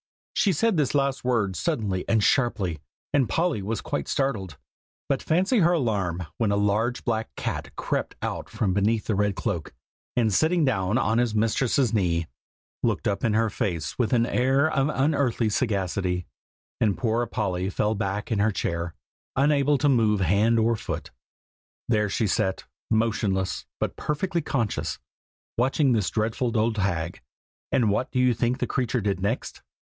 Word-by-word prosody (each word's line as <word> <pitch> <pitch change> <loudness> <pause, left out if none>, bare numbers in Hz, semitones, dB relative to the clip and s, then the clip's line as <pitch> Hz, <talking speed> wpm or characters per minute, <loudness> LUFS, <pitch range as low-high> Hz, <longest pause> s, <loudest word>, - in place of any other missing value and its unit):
She 200 - +3
said 215 +3 +1
this 145 -2 +1
last 140 -1 +1
word 115 -7 +1
suddenly 105 - -1
and 110 -2 +3
sharply, 100 - +1 0.3
and 135 -7 +3
Polly 165 - +1
was 105 +3 -3
quite - - -3
startled; 100 - -1 0.5
but - - 0
fancy 190 +9 +2
her 175 -1 +4
alarm 100 - 0
when 110 -3 +2
a - - +2
large 105 +4 +1
black 110 -2 -1
cat - - -3
crept - - -2
out - - -3
from 95 -4 0
beneath 105 +3 +1
the 110 - 0
red 105 0 +1
cloak, 90 - -3 0.4
and 115 -4 +2
sitting 160 - +3
down 95 -4 +1
on 115 -2 +2
his 120 -3 +1
mistress's 115 +2 +2
knee, 85 -5 +1 0.6
looked - - 0
up 100 - -1
in 110 -2 +2
her 115 -1 +2
face 85 - -3
with 120 - +1
an 120 -2 +3
air 135 +4 +2
of 140 -1 +1
unearthly 135 -6 +1
sagacity, 95 -5 -1 0.5
and 105 -3 +2
poor 120 0 0
Polly 95 -4 -1
fell 105 +3 0
back 100 0 -3
in 110 - +1
her 105 +2 +3
chair, 85 -3 -3 0.4
unable 145 +1 +3
to 145 - +1
move 110 -6 +3
hand 100 +6 +3
or 115 +1 +3
foot. - - -5 0.8
There 105 -3 +2
she 110 - 0
sat, 95 -1 0 0.3
motionless, 110 -4 0
but - - -2
perfectly 170 +3 -1
conscious, 120 -7 -2 0.6
watching 135 +2 +3
this 110 -5 +1
dreadful 115 +2 -1
old 110 0 +1
hag. 85 -3 -1 0.5
And 115 -6 +3
what 120 +5 0
do - - -2
you 125 -1 +4
think 120 +2 0
the - - -1
creature 125 -2 -1
did 100 -2 -1
next? 105 +6 -2
110 Hz, 165 wpm, -25 LUFS, 100-130 Hz, 0.8 s, her